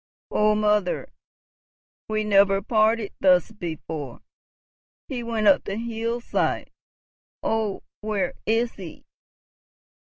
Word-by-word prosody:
Oh, 210 0 +3
mother, 210 -3 +1 1.0
we 215 0 0
never 200 -1 +4
parted 215 0 +2
thus 185 0 +4
before! 160 - -6 0.8
He 255 -4 -4
went 230 -2 -2
up 195 - +5
the 195 - -3
hillside. 230 +1 -2 0.7
Oh, 220 -3 -1 0.2
where 205 -4 -1
is 230 +2 +2
he?" 180 -5 -10
210 Hz, 95 wpm, -25 LUFS, 195-225 Hz, 1.0 s, up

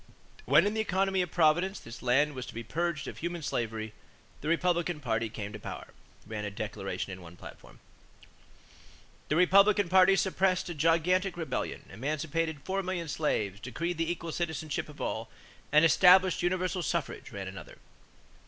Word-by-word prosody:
"When 150 - +5
in 205 - +1
the 220 - 0
economy 190 -2 +1
of 180 - -2
Providence, 175 +4 +2
this 115 +2 -10
land 140 +4 +2
was 130 -2 -6
to - - -10
be 115 - -5
purged 160 +5 -2
of - - -7
human 170 0 -4
slavery... 110 -4 -3 0.5
the 150 - -5
Republican 170 0 +1
party 115 -4 -1
came 105 -1 -6
into 105 - -7
power," - - -8 0.4
ran 105 0 -5
a 105 - -2
declaration 100 -1 -5
in 90 - -9
one 85 0 -12
platform. - - -13 1.5
"The 150 - +2
Republican 195 +2 +5
party 190 +1 +6
suppressed 190 -1 +1
a - - -3
gigantic 170 +4 +2
rebellion, 165 -2 -4
emancipated 155 +3 -2
four 195 +1 -1
million 180 -3 -3
slaves, 105 -11 -1
decreed 165 - -4
the 165 +1 +1
equal 170 -1 -5
citizenship 160 -3 -3
of - - -13
all, - - -3 0.4
and 150 +2 +6
established 185 +2 +6
universal 185 +1 0
suffrage," 150 - -3
ran - - -6
another. - - -9
165 Hz, 160 wpm, -30 LUFS, 125-180 Hz, 1.5 s, party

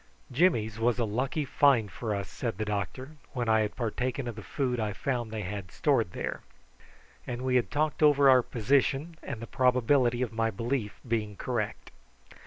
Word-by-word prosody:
"Jimmy's 115 - +2
was 120 +1 +2
a 120 - +1
lucky 130 +7 -1
find 130 -7 +3
for 110 +4 -3
us," 100 -1 -4
said 115 -6 -4
the 110 - -2
doctor, 105 +8 -4 0.2
when 120 -2 -2
I 110 0 +4
had 105 -1 -1
partaken 125 +2 -2
of 120 - -4
the 110 - -7
food 125 +2 -2
I 105 -2 -1
found 120 +2 -2
they 110 -1 -4
had 95 -1 -5
stored 120 - +1
there, - - -4 0.9
and 120 +1 -4
we 130 -1 +1
had 125 - +2
talked 150 +1 -1
over 145 -2 +6
our 130 -1 +7
position 135 +7 +1
and 135 -6 -6
the 115 - -6
probability 125 0 +2
of 115 - -4
my 115 0 +1
belief 115 +1 -3
being 110 -3 -1
correct. 110 -1 -3
120 Hz, 185 wpm, -29 LUFS, 110-135 Hz, 0.9 s, our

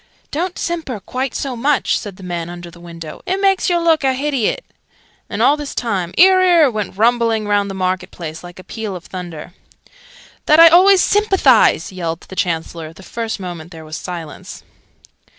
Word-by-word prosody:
("Don't 355 +4 -3
simper 320 -10 -3
quite 255 +6 -4
so 270 -3 -3
much!" 275 +4 +1
said 205 -3 -5
the 190 - -14
man 175 -2 -4
under 175 0 -9
the 170 - -16
window. 165 -2 -10
"It 375 +1 0
makes 390 -2 +2
yer 350 - +2
look 330 -3 +2
a 265 -1 +2
hidiot!" 275 - -1 0.7
And, - - -1
all 290 - +5
this 295 -2 -7
time, 195 -7 -2
"'Ear, 375 +1 +6
'ear!" 340 -7 +5
went 210 -3 -4
rumbling 230 -1 +2
round 205 -1 +1
the 195 - -6
market 185 0 -2
place, 160 -1 -8
like 175 0 -11
a 185 - -11
peal 215 -2 -6
of 180 - -9
thunder.) 175 -2 -8 0.9
"That 305 +1 +6
I 330 0 +10
always 370 +3 +6
sympathise!" 375 - +3
yelled 170 -3 -4
the 190 - -12
Chancellor, 165 -2 -3
the 190 - -15
first 225 +2 -4
moment 175 -3 -7
there 160 -3 -11
was 155 0 -7
silence. 170 -4 -8
210 Hz, 185 wpm, -18 LUFS, -, 0.9 s, I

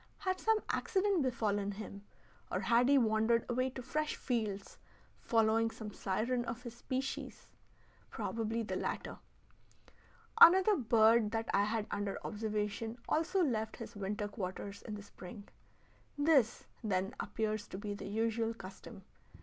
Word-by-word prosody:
Had 370 -1 -1
some 445 0 +3
accident 395 -4 +1
befallen 205 -6 0
him, 200 0 -8 0.5
or - - 0
had 240 +2 +4
he 280 - +6
wandered 225 -1 +3
away 255 +1 0
to 260 0 -8
fresh 305 +4 -1
fields, 215 -6 -3 0.4
following 225 0 +3
some 215 -2 -8
siren 235 +6 -1
of 240 +1 -5
his 240 -2 -7
species? 260 +2 -4 0.6
Probably 225 0 -2
the - - -3
latter. - - -4 1.2
Another 380 +4 +9
bird 225 - +4
that 225 0 -2
I 200 - +4
had 215 0 -1
under 205 -1 -2
observation 215 +1 -2
also 355 +4 +2
left 220 -7 -1
his 235 - -8
winter 205 +1 -2
quarters 200 0 -5
in 215 - -6
the 205 - -8
spring. 200 +1 -11 0.7
This, 285 -6 +3 0.2
then, 195 +1 0
appears 215 -1 -2
to - - -7
be 205 0 -4
the 200 - -7
usual 225 +2 0
custom. 190 -1 -10
225 Hz, 140 wpm, -34 LUFS, 205-250 Hz, 1.2 s, Another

